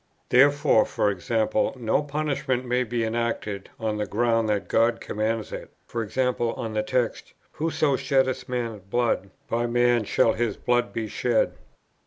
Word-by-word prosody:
Therefore, 145 -1 +5 0.2
e.g. 110 +4 0 0.3
no 120 +2 +1
punishment 145 -3 -2
may 125 +1 +1
be 120 0 -2
enacted, 110 -3 -2
on 110 -1 -1
the 105 -1 -2
ground 115 +1 +1
that 105 -1 0
God 115 +1 +2
commands 110 +1 -2
it: - - -8 0.2
e.g. 115 +2 -3
on 120 -3 0
the 110 - +1
text, 120 +2 -2 0.2
"Whoso 155 -3 0
sheddeth 130 -1 0
man's 115 -4 -3
blood, 100 0 0 0.2
by 120 +1 0
man 120 -1 +3
shall - - +3
his 115 -3 -1
blood 120 0 +1
be 115 -1 -3
shed." 115 +1 +1
120 Hz, 145 wpm, -25 LUFS, 110-125 Hz, 0.3 s, Therefore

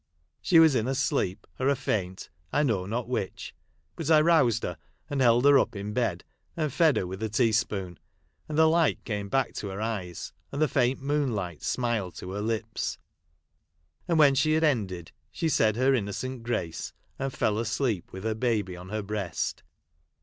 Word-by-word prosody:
She 175 - +4
was 160 -2 +7
in 115 -2 +1
a 135 - 0
sleep, 110 -7 -1
or 130 - +1
a 140 - +4
faint, 95 -9 -3 0.2
I 150 - +2
know 100 -9 0
not 115 +3 -2
which; 115 -6 -4 0.4
but 165 -2 -4
I 155 -1 +7
roused 150 -8 +3
her, 90 -3 -4 0.3
and 140 -2 0
held 120 +1 +4
her 140 -1 +7
up - - -1
in 100 +1 -5
bed, 105 -8 -1 0.3
and 155 -5 -1
fed 160 -4 +4
her - - 0
with 95 +3 -7
a 110 - -1
teaspoon, 105 -5 0 0.5
and 150 - -3
the 160 - +6
light 160 -1 +2
came 105 -3 -3
back 135 0 +1
to 105 - -4
her 95 +1 -5
eyes, 105 -6 -4 0.2
and 140 - -4
the 155 - +4
faint 130 0 +1
moonlight 120 - -1
smile 120 -6 -1
to 90 - -8
her 100 +2 -3
lips; 110 0 -2 1.1
and 170 -2 +2
when 145 -3 +6
she 150 +3 +2
had 160 +1 +2
ended, 100 - 0 0.2
she 165 - -1
said 110 -7 +3
her 130 +3 +3
innocent 125 +3 -2
grace, 110 -9 -3 0.3
and 135 0 -2
fell 105 -3 0
asleep 115 -4 -1
with 95 +1 -8
her 110 0 0
baby 110 -5 -1
on 90 +1 -10
her 110 +1 -3
breast. 100 -4 -3
115 Hz, 185 wpm, -27 LUFS, 100-135 Hz, 1.1 s, was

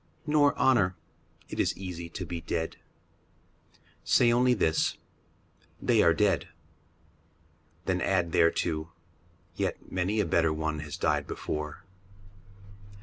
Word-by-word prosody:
Nor 150 -2 +3
honour. 100 -9 +3 0.5
It - - -7
is - - +1
easy 85 -3 -6
to 90 +2 -6
be 85 0 -5
dead. 80 0 -3 1.3
Say 120 -1 +4
only 125 +1 +4
this, 80 -7 +1 0.4
" - - -35
They - - +5
are 85 - +5
dead." 90 -2 +1 1.4
Then 90 -1 0
add 90 -3 +1
thereto, 80 -1 +1 0.3
" 85 -1 -35
Yet - - -3
many 95 +4 0
a 105 - +2
better 80 -1 +2
one 80 0 -2
has 75 -1 -6
died - - 0
before." 75 -1 -5
85 Hz, 125 wpm, -28 LUFS, 80-100 Hz, 1.4 s, They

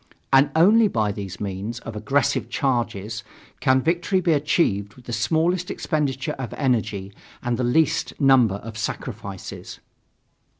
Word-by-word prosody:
And 135 +2 +6
only 210 +7 +6
by 110 - 0
these 100 -2 -7
means 100 +3 -4
of 115 - -8
aggressive 120 +6 0
charges 115 -5 -1 0.4
can 130 -2 +3
victory 175 +3 +1
be 175 -2 +2
achieved 110 - +1
with 125 - -17
the 120 - -5
smallest 165 - +1
expenditure 150 -2 -1
of 125 -4 -5
energy 110 -7 -1 0.3
and 120 -1 0
the 125 - -2
least 145 +6 +1
number 130 -7 +5
of 110 +2 -8
sacrifices. - - -6
125 Hz, 135 wpm, -23 LUFS, 110-150 Hz, 0.4 s, And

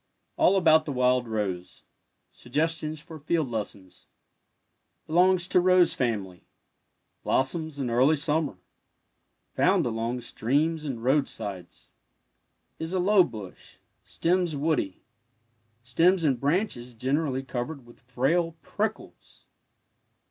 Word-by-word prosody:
ALL 195 - +4
ABOUT 160 -4 +5
THE 150 - -3
WILD 125 -1 +2
ROSE 100 -5 -4 0.5
SUGGESTIONS 155 +3 -2
FOR 160 0 -11
FIELD 155 +1 0
LESSONS 100 -4 -6 1.0
Belongs 180 +2 +3
to - - +4
rose 180 -1 +4
family. 100 -8 -3 0.7
Blossoms 155 +3 -1
in 130 -4 -2
early 130 +6 +4
summer.. 150 - -1 1.0
Foimd - - +3
along 115 +1 -2
streams 150 +8 -1
and 125 -5 -5
roadsides. 105 - -2 0.9
Is 160 +2 -4
a 185 - +1
low 195 +1 +5
bush— 105 - -10 0.3
stems 175 -2 0
woody— 140 - -1 0.8
stems 165 +9 +2
and 135 -6 +2
branches 140 - -1
generally 135 +2 -1
covered 130 +2 -5
with 120 - -17
frail 155 +8 0
prickles. 215 +1 -5
140 Hz, 105 wpm, -27 LUFS, 120-165 Hz, 1.0 s, ABOUT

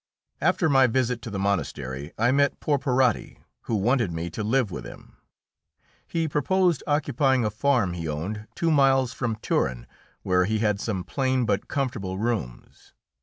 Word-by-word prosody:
After 175 - +2
my 135 -3 +5
visit 125 -1 0
to 115 - -7
the 100 - -4
monastery 75 -7 -2
I 120 +3 +3
met 140 +1 +2
Porporati, 130 -4 +1 0.3
who 115 - -1
wanted 115 -1 +1
me 85 +1 -4
to 110 - -4
live 115 -1 +1
with - - -6
him. - - -12 0.9
He 165 -1 -1
proposed 170 +2 +1
occupying 140 -4 +2
a 105 - 0
farm 115 -5 +1
he 85 -2 -4
owned 95 +9 -4
two 165 -1 +1
miles 135 -3 +3
from 120 -3 -2
Turin, 60 - -1 0.4
where 90 0 +2
he 110 +3 0
had 105 -2 +1
some 100 -5 -2
plain 130 +3 0
but 100 -3 -1
comfortable 115 -9 -2
rooms. 105 - -4
115 Hz, 160 wpm, -25 LUFS, 100-135 Hz, 0.9 s, my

